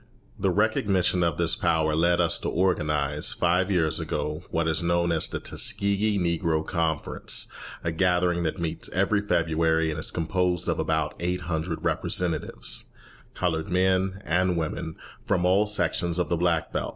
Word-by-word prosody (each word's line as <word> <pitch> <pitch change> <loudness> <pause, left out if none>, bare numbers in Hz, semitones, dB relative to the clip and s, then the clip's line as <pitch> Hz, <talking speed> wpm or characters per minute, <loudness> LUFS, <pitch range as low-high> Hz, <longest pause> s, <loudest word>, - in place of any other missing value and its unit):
The 95 - +1
recognition 100 -2 +1
of 85 -3 +1
this 85 -1 +2
power 80 -4 +1
led 85 +2 +3
us 85 -2 +3
to - - -3
organise, 75 -5 0
five 90 +2 +1
years 85 -6 +2
ago, 75 +1 -3
what 80 0 0
is 80 +2 +1
known 85 0 +1
as 80 -1 0
the - - -4
Tuskegee 100 +1 +1
Negro 85 -3 0
Conference, 80 -3 -1 0.4
a 85 - -1
gathering 90 0 +1
that 80 0 -2
meets 85 -1 -3
every 100 +3 +2
February, 80 -3 +1
and 80 - -4
is - - -2
composed 90 +1 -1
of - - 0
about 80 -1 0
eight 90 +1 -1
hundred 80 0 -3
representatives, 90 -2 0 0.5
coloured 80 +1 -1
men 95 +1 +1
and 90 +2 +1
women, 80 0 -3 0.3
from 90 -1 0
all 100 +4 +3
sections 85 -4 -1
of 90 - 0
the 85 - +2
Black 85 -1 0
Belt. - - -2
85 Hz, 160 wpm, -26 LUFS, 80-90 Hz, 0.5 s, led